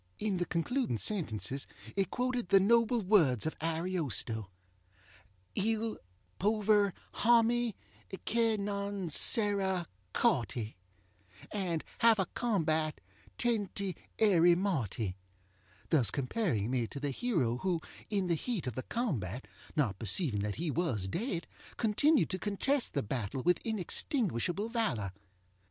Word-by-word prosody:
In 210 -3 -1
the 175 -1 -1
concluding 205 - 0
sentences 135 - -1 0.3
it 195 - +1
quoted 250 -5 -1
the 195 - +7
noble 230 +3 +3
words 165 - +4
of 155 - -2
AriostoŌĆö 160 - -1 1.1
Il 220 +2 0 0.4
pover 210 0 +3 0.2
hommy 235 0 +3 0.5
che 230 -1 +2
non 200 -2 -3
sera 195 - +3 0.3
corty 115 0 0 0.8
And 180 -6 -2 0.2
have 230 -2 +6
a 190 - +1
combat 160 -9 0 0.4
tenty 200 -5 0 0.2
erry 175 -5 +5
morty; 115 - -1 0.7
thus 135 -8 +5
comparing 130 - -1
me 125 -3 0
to 140 - -7
the 145 0 -2
hero 135 - 0
who, 180 +3 0 0.3
in 200 -3 0
the 175 - +1
heat 195 - -2
of 125 - -3
the 130 - -3
combat, 130 - -3 0.3
not 115 - 0
perceiving 115 - +2
that 105 0 -2
he 165 -1 -2
was 130 - -1
dead, 175 - -2 0.3
continued 265 +7 +3
to 185 - -2
contest 235 - 0
the 140 - +1
battle 125 +3 -3
with 175 -1 +3
inextinguishable 205 - 0
valor. 155 - -1
185 Hz, 120 wpm, -32 LUFS, 135-220 Hz, 1.1 s, the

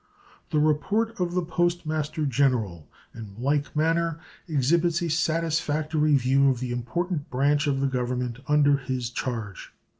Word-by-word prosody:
The - - 0
report 205 +10 +1
of 175 -1 -1
the 180 - +1
Post 175 +1 0
Master 155 0 -2
General 120 - 0 0.2
in 110 -4 -10
like 140 +5 -1
manner 165 +1 +1 0.3
exhibits 165 +3 +2
a 170 - -1
satisfactory 155 -2 +1
view 135 +1 +3
of 130 -3 0
the 125 -1 -4
important 145 +6 -3
branch 145 +3 +1
of 135 -1 0
the 140 - +2
Government 125 -1 -2
under 145 -1 +4
his 125 -2 -4
charge. 115 -6 -5
145 Hz, 145 wpm, -26 LUFS, 125-165 Hz, 0.3 s, under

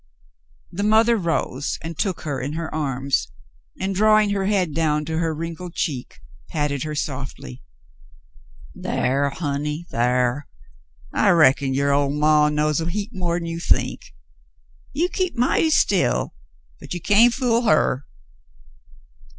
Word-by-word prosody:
The 180 +3 -4
mother 220 +3 +4
rose 165 - -2
and 165 0 -5
took 185 +2 -2
her 140 -4 -3
in 140 +3 -4
her 160 0 -5
arms, 135 - -1 0.5
and, 195 +1 -1
drawing 215 +1 +4
her 195 -1 0
head 190 -6 +1
down 150 -1 0
to 160 +1 -2
her 165 -1 0
wrinkled 165 +2 -6
cheek, 135 -8 -4 0.3
patted 145 -3 -1
her 155 -1 -4
softly. 135 -2 -5 1.1
"Thar, 140 +2 0
honey, 150 +2 -3
thar. 125 +3 0 0.7
I 205 - +3
reckon 140 -6 +4
your 140 +1 +2
ol' 140 0 +2
maw 150 +1 +3
knows 150 +1 0
a 165 - -2
heap 205 +3 -4
more'n 175 -2 -2
you 165 0 -4
think. 115 - -1 0.8
You 340 +4 0
keep 370 -2 -2
mighty 255 +6 +2
still, 200 - +2 0.5
but - - -7
you - - -3
can't 210 +7 +5
fool 240 -2 +1
her." 155 - +2
160 Hz, 135 wpm, -22 LUFS, 140-195 Hz, 1.1 s, can't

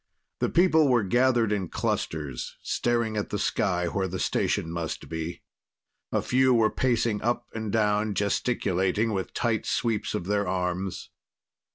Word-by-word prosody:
The - - +1
people 165 -4 +4
were 120 -4 +3
gathered 120 +1 +3
in 95 -5 -1
clusters, 70 -5 -3
staring 115 -2 0
at 105 - -2
the 105 - -2
sky 90 -3 0
where 95 +2 -1
the 95 +1 -4
station 80 - 0
must 85 -1 -4
be. 80 +1 -5 0.7
A - - 0
few 130 0 +3
were 110 -2 +3
pacing 115 -4 +1
up 120 +1 0
and 110 -2 -4
down, 105 -1 +1
gesticulating 100 0 0
with 95 -2 -3
tight 115 -2 0
sweeps 115 -3 0
of 90 - -3
their 100 0 0
arms. 90 0 -2
105 Hz, 150 wpm, -27 LUFS, 95-120 Hz, 0.7 s, people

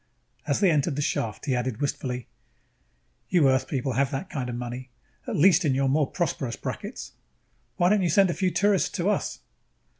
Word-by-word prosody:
As - - +1
they 190 -4 +5
entered 150 -1 +1
the 145 - -1
shaft, 110 -4 -2
he 135 -4 +1
added 125 -2 -2
wistfully: 125 -3 -3 1.0
"You 170 -6 +4
Earth 130 0 +2
people 135 -2 -2
have 135 +2 +1
that 180 +9 -5
kind 130 -4 -3
of 120 - -4
money, 125 +2 -6 0.4
at - - -2
least 185 +3 +5
in 140 -5 +2
your 135 0 +1
more 145 +1 +2
prosperous 140 - -2
brackets. - - -6 0.7
Why 175 - +4
don't 210 0 +3
you 175 - +1
send 190 +2 +4
a - - -2
few 185 +1 0
tourists 200 +1 +2
to 185 +3 +1
us?" - - -2
140 Hz, 190 wpm, -26 LUFS, 130-180 Hz, 1.0 s, they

